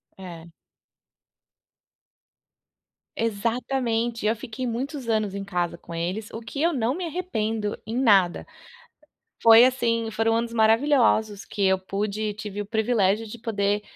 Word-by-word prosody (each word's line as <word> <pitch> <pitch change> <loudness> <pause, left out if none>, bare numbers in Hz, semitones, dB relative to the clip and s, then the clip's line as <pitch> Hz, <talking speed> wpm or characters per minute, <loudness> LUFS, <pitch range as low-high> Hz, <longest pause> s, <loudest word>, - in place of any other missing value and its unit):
É. 170 -3 -10 2.7
Exatamente, 230 +1 -1
eu 225 - +2
fiquei 245 +2 -6
muitos 260 +1 -4
anos 215 -3 0
em 200 0 -4
casa 175 -3 -2
com 170 - -11
eles, 185 +6 -3
o 225 - -6
que 275 +5 -6
eu 340 +1 +3
não 245 0 0
me 360 -1 -4
arrependo 225 - -2
em 225 +3 -4
nada. 195 -8 +3 1.0
Foi 230 +1 +9
assim, 230 -3 +1
foram 225 +1 +1
anos 230 0 -2
maravilhosos 225 -2 +3
que 205 - -5
eu 190 0 +4
pude 205 +2 -3
tive 205 -1 -6
o 205 - -4
privilégio 220 -1 +1
de 230 +2 -9
poder 205 -2 -1
225 Hz, 135 wpm, -25 LUFS, 205-235 Hz, 2.7 s, Foi